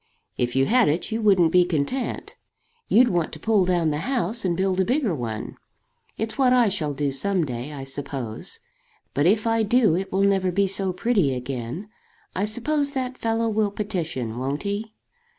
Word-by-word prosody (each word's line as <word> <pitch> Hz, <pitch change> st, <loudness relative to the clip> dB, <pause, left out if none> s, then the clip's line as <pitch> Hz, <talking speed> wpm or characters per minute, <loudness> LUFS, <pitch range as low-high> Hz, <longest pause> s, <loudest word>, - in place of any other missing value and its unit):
"If 120 Hz, 0 st, -1 dB
you 135 Hz, 0 st, +3 dB
had 240 Hz, -, +4 dB
it 165 Hz, +9 st, -1 dB
you 225 Hz, +1 st, -1 dB
wouldn't 190 Hz, -6 st, +4 dB
be 180 Hz, +1 st, +5 dB
content. 175 Hz, -, -2 dB, 0.5 s
You'd 245 Hz, +3 st, +5 dB
want 175 Hz, -5 st, 0 dB
to 155 Hz, -, -7 dB
pull 210 Hz, +1 st, +2 dB
down 175 Hz, -3 st, +1 dB
the 150 Hz, -, -2 dB
house 240 Hz, -, -1 dB
and 175 Hz, -3 st, 0 dB
build 190 Hz, 0 st, 0 dB
a -, -, +4 dB
bigger 245 Hz, -, 0 dB
one. 115 Hz, -6 st, -5 dB, 0.6 s
It's 220 Hz, +4 st, -4 dB
what 255 Hz, -2 st, +4 dB
I 245 Hz, -4 st, +4 dB
shall 155 Hz, -7 st, -2 dB
do 145 Hz, 0 st, -1 dB
some 185 Hz, +5 st, 0 dB
day, 125 Hz, +1 st, -5 dB
I 140 Hz, -2 st, -7 dB
suppose. 135 Hz, -, -3 dB, 0.5 s
But 145 Hz, +3 st, +2 dB
if 215 Hz, +4 st, +3 dB
I 225 Hz, 0 st, +2 dB
do 220 Hz, -4 st, +3 dB
it 190 Hz, +2 st, -3 dB
will 195 Hz, +1 st, +1 dB
never 195 Hz, -2 st, +2 dB
be 200 Hz, +3 st, +2 dB
so 195 Hz, 0 st, +1 dB
pretty 185 Hz, -, +1 dB
again. 125 Hz, -, -5 dB, 0.5 s
I 195 Hz, -, 0 dB
suppose 280 Hz, +6 st, 0 dB
that 260 Hz, -2 st, -3 dB
fellow 225 Hz, 0 st, 0 dB
will 215 Hz, -1 st, +1 dB
petition; 165 Hz, -, -3 dB
won't 135 Hz, +5 st, -3 dB
he?" 210 Hz, +2 st, -4 dB
190 Hz, 185 wpm, -24 LUFS, 150-225 Hz, 0.6 s, be